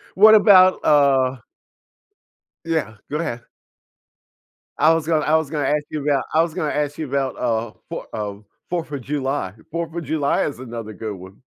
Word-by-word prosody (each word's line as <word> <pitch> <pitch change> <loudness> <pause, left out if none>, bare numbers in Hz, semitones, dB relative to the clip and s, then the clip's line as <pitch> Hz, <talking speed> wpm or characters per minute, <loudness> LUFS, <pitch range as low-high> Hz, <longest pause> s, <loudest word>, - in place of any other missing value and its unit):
What 215 +3 +8
about, 190 -4 +6
uh 135 -3 +4 1.3
Yeah, 155 -10 -2 0.2
go 150 - -1
ahead. 120 -8 -4 1.3
I 155 +3 +5
was 165 -1 -1
gonna 155 -2 +2
I 155 - +3
was 160 -3 +1
gonna 150 -3 -2
ask 150 0 +1
you 150 - -4
about 140 -3 +1
I 160 - +5
was 165 -1 -1
gonna 160 -5 -2
ask 145 0 -2
you 155 -3 -4
about, 135 -1 -2
uh, 115 -2 -1 0.2
4, - - -6
uh, 105 -2 -4 0.3
4th 170 -3 -3
of 140 -3 -4
July 135 -7 -2 0.2
4th 165 0 -4
of 170 - -3
July 145 0 0
is 140 -4 -5
another 115 -3 -7
good 105 +1 -6
one. 95 +2 -13
145 Hz, 175 wpm, -21 LUFS, 125-160 Hz, 1.3 s, What